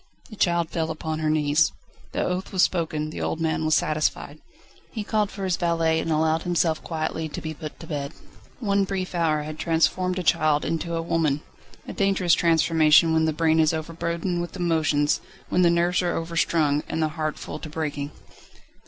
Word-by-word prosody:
The - - -8
child 170 -4 +1
fell 160 -1 -1
upon 160 0 -4
her 155 -1 0
knees. 155 +1 +3 0.4
The - - -1
oath 180 +1 -3
was 185 -2 +3
spoken, 155 -3 0
the - - -6
old 160 - -2
man 160 -1 0
was 155 - +3
satisfied. 155 0 -1 0.5
He 220 - -4
called 210 -1 0
for 200 - -7
his 185 -2 0
valet, 165 -2 +1
and 165 - -2
allowed 160 +1 +2
himself 170 -2 0
quietly 160 -1 -3
to - - -6
be 160 0 -5
put 155 -1 -9
to - - -9
bed. 145 -3 -4 0.5
One 200 -4 +1
brief 190 -1 -3
hour 160 -3 +1
had 155 +1 -7
transformed 180 +3 +1
a 185 - -2
child 155 -1 +2
into 165 +1 -2
a 165 - -2
woman. 160 -3 0 0.4
A - - -5
dangerous 195 -4 +2
transformation 165 -1 +4
when 160 0 +3
the 160 - +2
brain 160 +1 +2
is 160 0 +3
overburdened 170 +2 -3
with 175 - -6
emotions, 160 -5 +1 0.3
when 180 - +2
the 175 - +5
nerves 170 +1 +2
are 175 -1 -1
overstrung 165 -3 +1
and - - -2
the 155 -1 +1
heart 155 -1 -3
full - - -7
to 155 - -8
breaking. 150 -2 -3
160 Hz, 190 wpm, -24 LUFS, 155-175 Hz, 0.5 s, the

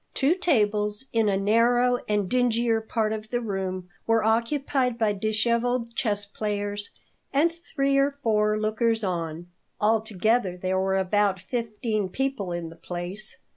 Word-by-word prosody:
Two 275 +5 +3
tables 210 - +1
in 225 -2 +3
a 195 - +2
narrow 240 +4 +3
and 205 -2 +1
dingier 235 -1 +2
part 220 -1 -1
of 215 0 -6
the 240 - 0
room 190 -4 -3 0.2
were 225 -1 +3
occupied 250 +2 +1
by 220 -3 +2
disheveled 235 +3 0
chess 205 -4 -1
players 205 0 -3 0.4
and 300 +5 +3
three 275 -5 0
or 280 +1 +1
four 210 -1 +2
lookers 220 +1 +1
on. 170 -3 -3 0.3
Altogether 220 -2 +1
there 185 +1 0
were 190 0 +1
about 195 0 +2
fifteen 215 0 -2
people 265 -5 -2
in 175 -1 -4
the 165 - -12
place. 175 +5 -6
215 Hz, 140 wpm, -26 LUFS, 200-240 Hz, 0.4 s, Two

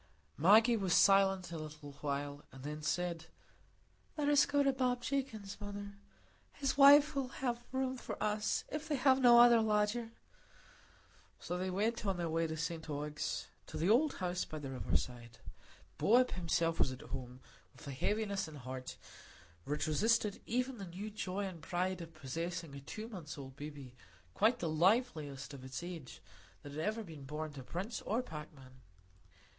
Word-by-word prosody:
Maggie 220 +8 +6
was 190 -5 +1
silent 195 -2 +5
a 165 - -4
little 150 -1 -8
while, 145 0 -3
and 135 -1 -12
then 150 +1 -5
said,— 165 +1 -2 0.9
"Let 290 -1 +1
us 290 -2 +5
go 285 0 +3
to 275 -1 +3
Bob 250 -2 0
Jakin's, 220 -8 -3
mother; 205 0 -7 0.5
his 275 -1 -1
wife 285 +1 +8
will 275 -2 -1
have 245 -2 -3
room 260 0 -1
for - - -6
us, 210 0 0
if 305 +1 -4
they 305 - 0
have 265 0 +4
no 240 -1 +8
other 240 -1 +8
lodger." 215 +2 +1 1.3
So 180 - -4
they 185 +1 -2
went 210 +5 0
on 195 -3 0
their 170 -2 -2
way 165 0 +1
to 160 0 -4
St 165 0 -4
Ogg's, 150 0 -3 0.2
to - - -6
the 175 +6 +2
old 275 +6 +4
house 180 -1 -1
by 155 - -7
the 140 -3 -6
river 130 - 0
side. 120 -1 -7 0.6
Bob 250 +3 +5
himself 165 -2 0
was - - +3
at 130 - -8
home, 125 0 -7 0.4
with - - -12
a - - -4
heaviness 200 +6 -1
at 155 - -10
heart 130 -1 -7 0.7
which 150 +1 -1
resisted 210 +6 +2
even 250 +1 -1
the 195 - -5
new 195 +5 -6
joy 200 -1 -3
and 180 -4 -7
pride 180 +2 -1
of 165 -1 -10
possessing 165 +2 -4
a 140 - -7
two 215 +11 -7
months' 170 -9 -8
old 135 -2 -9
baby, 145 -3 -8 0.4
quite 220 +4 +3
the - - -2
liveliest 155 - +1
of 135 -2 -9
its 130 +4 -6
age 170 -7 -8 0.4
that 145 - -8
had 150 +2 -4
ever 220 +5 -1
been 160 -7 -10
born 150 +2 -5
to 140 - -8
prince 185 - -4
or 230 +5 -1
packman. 145 - -10
180 Hz, 175 wpm, -35 LUFS, 150-225 Hz, 1.3 s, wife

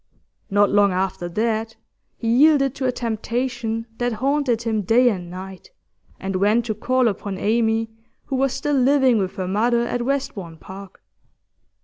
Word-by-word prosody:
Not 205 0 +3
long 205 -1 +4
after 185 -1 -2
that 225 +3 -1 0.4
he 230 - -4
yielded 275 +2 +4
to 265 -2 -2
a - - +2
temptation 235 0 -3
that 245 -1 0
haunted 260 0 0
him 220 -2 0
day 240 +6 +4
and 180 -5 -4
night, 185 +1 -9 0.5
and 190 0 -3
went 210 +5 +2
to 220 - -1
call 255 +3 +1
upon 200 -2 -3
Amy, 225 +1 +1 0.3
who 270 - -3
was 270 0 +1
still 290 +3 -2
living 265 -3 +4
with 190 -1 -2
her 185 -1 -3
mother 235 +5 +2
at 245 0 -2
Westbourne 230 -10 -3
Park. 190 +4 -12
225 Hz, 155 wpm, -22 LUFS, 200-250 Hz, 0.5 s, long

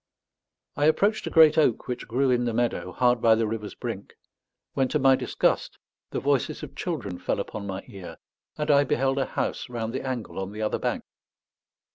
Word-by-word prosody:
I 145 - +1
approached 200 +8 +2
a - - -1
great 160 -1 +6
oak 130 -7 +2
which 125 -1 -4
grew 130 +3 +1
in 125 0 +2
the 120 -2 -1
meadow, 120 0 -1
hard 125 -2 +2
by 115 -1 +6
the 115 0 +1
river's 105 -1 -4
brink; - - -6 0.6
when 135 -1 +1
to 150 - 0
my 135 -2 +5
disgust - - 0 0.3
the - - -2
voices 145 +2 0
of 145 - -8
children 120 - -4
fell - - -1
upon 100 0 -5
my 95 0 -5
ear, 100 -7 -9 0.4
and 150 0 +1
I 140 0 +6
beheld 135 0 +1
a 135 - +1
house - - -3
round 115 -2 -4
the 130 - -2
angle 130 -7 -4
on 95 +1 -5
the 105 - -6
other 105 - -1
bank. - - -2
125 Hz, 195 wpm, -26 LUFS, 110-140 Hz, 0.6 s, great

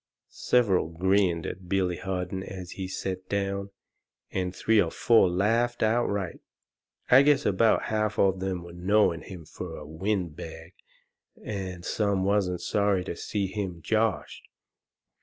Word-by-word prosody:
Several 105 -9 +3
grinned 90 0 +1
at 90 -1 -7
Billy 90 -2 +1
Harden 95 0 -3
as 95 -2 -8
he 95 -1 -5
set 95 0 -5
down, 100 0 -2 0.6
and 90 -1 -1
three 110 -2 +3
or 85 - 0
four 115 +1 +4
laughed 115 +7 +1
outright. 105 -5 0 0.7
I 130 +2 +9
guess 145 0 +3
about 110 +3 +3
half 110 -1 -1
of 95 -1 +3
them 95 -2 -3
there 85 0 -11
knowed 90 -1 +2
him 90 -4 -9
fur 80 +1 -7
a 75 - -9
wind 85 +1 -2
bag, 80 +2 -9 0.7
and 95 -4 -5
some 100 -3 0
wasn't 95 -3 +1
sorry 100 -3 +1
to 90 - -5
see 100 +3 -2
him 95 -4 -5
joshed. 110 -2 -1
95 Hz, 140 wpm, -27 LUFS, 90-105 Hz, 0.7 s, I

